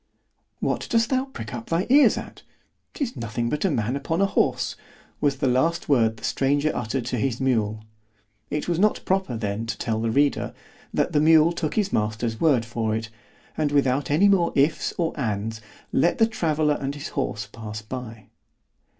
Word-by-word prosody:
—What - - -1
dost 230 +1 +2
thou 260 0 +2
prick 125 - -8
up 120 -2 -6
thy 170 +3 0
ears 285 +1 +6
at?—'tis 275 - -8
nothing 115 -1 -3
but 150 - -1
a - - +3
man 120 -4 -1
upon 160 +4 -2
a 195 - +4
horse——was 145 -6 -2
the 135 - 0
last 160 +8 +1
word 115 -5 +3
the - - -16
stranger 145 +3 +1
uttered 120 +1 -2
to 125 0 -2
his 120 +1 -1
mule. 110 -5 0 0.7
It 150 - -2
was 170 -1 0
not 210 +2 +2
proper 190 -11 0
then 110 +1 -3
to - - -3
tell 110 -2 -2
the 115 - 0
reader, 140 +5 +1 0.4
that - - 0
the 150 - +3
mule 160 +1 +6
took 160 -3 -3
his 205 -2 0
master's 110 +1 -1
word 135 -8 +3
for 115 -2 -1
it; 110 0 -4 0.5
and 150 -2 0
without 140 -1 +2
any 160 +8 +4
more 185 -4 +3
ifs 145 +3 +2
or 165 -2 0
ands, 110 -2 -2 0.3
let 165 +6 +3
the 225 - +5
traveller 155 -8 0
and 140 +1 -3
his 145 - -6
horse 110 -4 -2
pass 105 -2 -7
by. 115 -2 -8
135 Hz, 180 wpm, -24 LUFS, 115-160 Hz, 0.7 s, ears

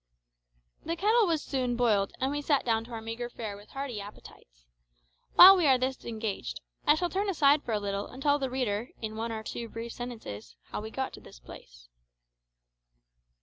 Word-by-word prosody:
The 335 - -2
kettle 430 +5 +3
was 325 -3 0
soon 255 -3 -1
boiled, 215 -5 +2
and 265 +1 0
we 290 0 -2
sat 285 -2 +1
down 225 -1 +1
to 240 - -14
our 225 -1 -5
meagre 230 +2 -5
fare 220 -4 -6
with 205 +1 -15
hearty 270 -6 -5
appetites. - - -14 0.7
While 380 +2 +11
we 350 -5 +2
are 265 -2 +6
thus 260 +1 -2
engaged, 215 - -4 0.3
I 295 - +7
shall 355 +3 0
turn 400 +2 0
aside 295 -5 +4
for 235 - -4
a 210 - +1
little 200 0 -3
and 255 - -11
tell 290 0 +3
the 265 -2 -2
reader, 245 -3 -2
in 220 -1 -5
one 230 +1 -3
or 220 -1 -5
two 230 +1 -6
brief 230 +1 -6
sentences, 220 - -8 0.2
how - - -3
we 220 - -6
got 265 +3 -4
to - - -11
this - - -14
place. - - -14
235 Hz, 195 wpm, -29 LUFS, 210-280 Hz, 0.7 s, While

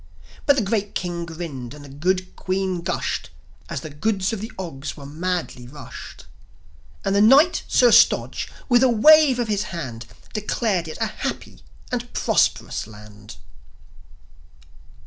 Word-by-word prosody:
But 285 - +6
the 255 - +1
great 205 0 -2
King 170 -1 -3
grinned, 150 -7 -7
and 145 -1 -12
the 135 -1 -12
good 185 +4 -1
Queen 185 -1 -2
gushed, 170 - -2 0.4
As 155 -6 -4
the 155 - -8
goods 195 +7 -1
of 210 - -4
the 220 +3 -6
Ogs 150 -7 -6
were 140 - -10
madly 160 -4 -3
rushed. 145 +3 -11 0.8
And - - +1
the 200 - +4
Knight, 275 +11 +6
Sir 245 -2 +5
Stodge, 230 +2 +4 0.2
with 245 -2 +4
a 260 - +5
wave 290 +3 +6
of 240 -2 -1
his 210 -1 0
hand, 120 -9 -6 0.3
Declared 210 -4 -1
it 155 - -7
a - - +1
happy 65 - -5 0.3
and - - -3
prosperous - - +1
land. 105 -2 -13
180 Hz, 145 wpm, -22 LUFS, 145-220 Hz, 0.8 s, But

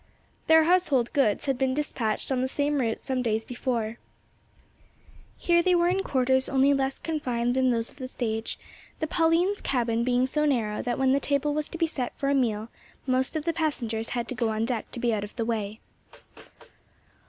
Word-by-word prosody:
Their 320 0 +7
household 310 -8 +2
goods 270 -3 +2
had 270 -3 0
been 260 -1 +1
dispatched 265 -6 -2
on 255 -1 +1
the 260 - +1
same 285 +2 0
route 225 -2 -1
some 260 -1 -2
days 225 -2 -1
before. 235 -2 -3 1.4
Here 345 -1 +3
they 360 +1 +3
were 345 0 +3
in 380 +2 +1
quarters 260 -4 +1
only 275 +1 +4
less 270 -1 0
confined 245 -7 -1
than 260 0 +2
those 230 -1 0
of - - -20
the 260 -2 -5
stage, 225 -3 -3 0.4
the 315 - 0
Pauline's 335 +5 +2
cabin 235 -3 0
being 250 +1 +2
so 300 +3 0
narrow 225 -7 0
that 245 -1 -2
when 265 -1 +3
the 275 - +3
table 285 +1 0
was 300 0 -2
to - - -7
be 335 - +2
set 265 -6 -4
for 275 - -1
a - - +3
meal, 225 -5 0 0.4
most 260 +2 0
of 310 -1 -2
the 335 - +1
passengers 240 -9 -2
had 235 - -2
to - - -1
go 230 -1 0
on 220 +1 0
deck 235 -2 -3
to - - -6
be 235 -1 +1
out 205 -2 -1
of 205 - -9
the 230 - -2
way. 220 -2 -3
260 Hz, 200 wpm, -27 LUFS, 235-295 Hz, 1.4 s, Their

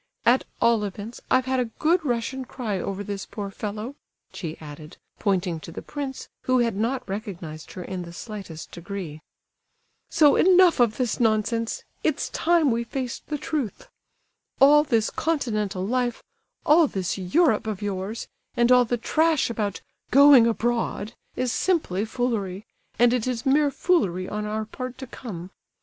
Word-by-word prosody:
At 250 +2 +4
all 235 -2 +3
events, 205 +3 -6
I've 255 0 +3
had 260 0 0
a 250 - +1
good 335 +2 +2
Russian 255 0 -2
cry 230 -6 -4
over 195 +2 -3
this 200 -1 -5
poor 200 -3 -6
fellow," 215 +5 -5 0.4
she 165 -3 -5
added, 155 0 -10 0.2
pointing 185 -5 0
to 165 - -10
the - - -7
prince, 280 -3 -5 0.2
who 255 0 +3
had 235 -4 +1
not 235 +5 -1
recognized 175 -6 -6
her 180 - -6
in 185 0 -5
the 170 -1 -8
slightest 190 -4 -8
degree. 175 -4 -7 0.9
"So 300 -3 +5
enough 365 -4 +6
of 235 -3 +3
this 250 -4 -1
nonsense; 225 0 +1 0.2
it's - - 0
time 330 -4 +3
we 230 +1 0
faced 250 +1 -5
the 300 - -2
truth. 285 -7 -4 0.7
All 295 +2 +7
this 230 -7 +1
continental 215 - -1
life, 245 +1 -1 0.4
all 315 +1 +6
this 190 -4 -3
Europe 220 - +2
of 210 -2 -3
yours, 200 +2 -3 0.3
and 240 +1 +4
all 250 -1 +7
the 240 +1 -1
trash 315 +2 +2
about 210 -4 -2 0.3
'going 275 -3 +8
abroad' 230 -2 -1 0.2
is 255 -1 0
simply 240 - 0
foolery, 220 -5 -2 0.3
and 240 0 +5
it 250 -1 0
is 245 -2 -2
mere 285 +2 +4
foolery 235 - +1
on 210 0 -3
our 215 +1 -2
part 255 +3 -7
to 265 - -7
come. 190 -8 -8
230 Hz, 160 wpm, -25 LUFS, 200-260 Hz, 0.9 s, going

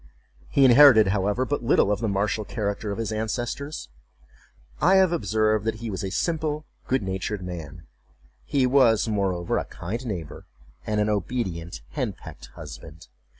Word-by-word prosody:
He 140 - +4
inherited, 120 -5 +8
however, 105 +5 0
but 145 -1 -2
little 110 -3 +3
of 105 - 0
the 115 - -1
martial 100 +2 0
character 105 0 -3
of 100 - -4
his 115 -1 -3
ancestors. 120 +7 -3 0.9
I 190 +2 +5
have 190 -2 +5
observed 110 -9 +1
that 110 -1 0
he 115 0 -6
was 95 - -4
a 95 - -2
simple 155 - -2 0.2
good 130 -4 +1
natured 95 +1 -3
man; 85 -3 -8 0.6
he 130 - +1
was, 125 -4 +4
moreover, 95 -5 0
a - - -4
kind 115 +8 -6
neighbor, 85 -8 -6 0.4
and 105 0 0
an 105 - +2
obedient 90 - -3
hen - - -2
pecked - - -12
husband. 75 +1 -11
110 Hz, 155 wpm, -25 LUFS, 95-125 Hz, 0.9 s, inherited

